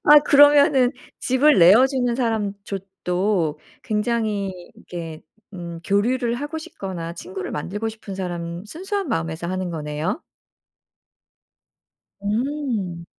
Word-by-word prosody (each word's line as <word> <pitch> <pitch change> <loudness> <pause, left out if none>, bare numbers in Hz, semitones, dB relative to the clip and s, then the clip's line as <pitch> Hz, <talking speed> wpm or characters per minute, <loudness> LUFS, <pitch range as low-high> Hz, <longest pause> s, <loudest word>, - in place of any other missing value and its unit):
아 295 0 +9
그러면은 285 -2 +6 0.3
집을 275 +4 +4
내어 195 +9 +8
주는 250 -3 0
사람조 205 -5 -2 0.3
도 180 -4 0 0.2
굉장히 215 -2 0 0.2
이렇게 165 -3 -8 0.3
음 170 -2 -6
교류를 235 +4 +1
하고 290 +5 -4
싶거나 190 - -6
친구를 185 +2 -6
만들고 205 +9 -3
싶은 220 -3 -8
사람 175 -1 -4
순수한 385 - -4
마음에서 165 -5 -2
하는 185 0 -2
거네요? 155 - -3 2.0
음. 215 - -2
205 Hz, 240 characters per minute, -22 LUFS, 175-255 Hz, 2.0 s, 아